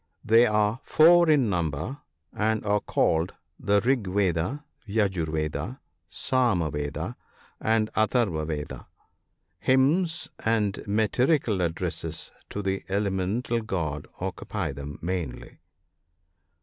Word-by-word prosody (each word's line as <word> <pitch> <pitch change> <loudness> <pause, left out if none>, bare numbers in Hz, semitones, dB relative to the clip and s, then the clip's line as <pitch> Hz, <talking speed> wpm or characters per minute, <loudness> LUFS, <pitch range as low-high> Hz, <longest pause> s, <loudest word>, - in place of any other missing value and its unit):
They 115 +2 +6
are 105 +2 +1
four 170 +1 +6
in 145 -6 +4
number, 85 - -2 0.3
and 110 0 0
are 105 0 +2
called 80 -3 +1 0.2
the 100 0 +2
Rig 120 -3 +1
Veda, 95 - 0 0.2
Yajur 95 -6 0
Veda, 75 -1 -3 0.3
Sama 110 - +1
Veda, 75 0 -4 0.4
and 110 -1 +1
Atharva 110 -8 +1
Veda, 75 -2 -5 0.7
Hymns 160 - +2 0.2
and 110 -3 +1
metrical 110 - +2
addresses 85 -2 -3 0.2
to 105 - -4
the 95 0 -1
elemental 100 +4 0
gods 80 -9 -3
occupy - - -3
them 70 +1 -7
mainly. 85 -7 -4
105 Hz, 105 wpm, -26 LUFS, 85-120 Hz, 0.7 s, They